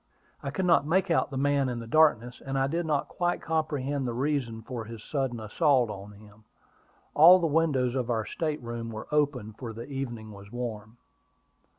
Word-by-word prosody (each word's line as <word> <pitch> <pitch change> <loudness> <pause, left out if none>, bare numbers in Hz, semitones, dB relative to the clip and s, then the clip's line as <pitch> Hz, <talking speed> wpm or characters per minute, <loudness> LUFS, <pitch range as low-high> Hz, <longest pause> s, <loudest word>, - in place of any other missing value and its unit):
I - - -4
could 165 +7 -2
not 170 -4 +4
make 180 +2 +2
out 165 - +2
the 135 - -5
man 140 -1 +2
in 120 - -3
the 115 - -6
darkness; 125 -3 +3
and 135 0 -3
I 135 - +2
did 165 +4 -2
not 150 -2 0
quite 175 0 -1
comprehend 145 -4 -1
the 120 - -3
reason 125 -4 -1
for 120 -1 -5
his 115 -1 -9
sudden 135 -5 -2
assault 125 +2 +2
on 100 +1 -9
him. 105 +1 -17 0.7
All 170 +5 +9
the 175 - -1
windows 145 -6 +2
of 125 -2 -2
our 110 -2 0
state 155 0 -3
room 115 -1 -5
were 110 -1 -7
open, 140 -8 0
for 115 0 -7
the 115 +2 -7
evening 120 -6 -5
was 100 0 -12
warm. 115 -2 -6
130 Hz, 195 wpm, -28 LUFS, 115-150 Hz, 0.7 s, All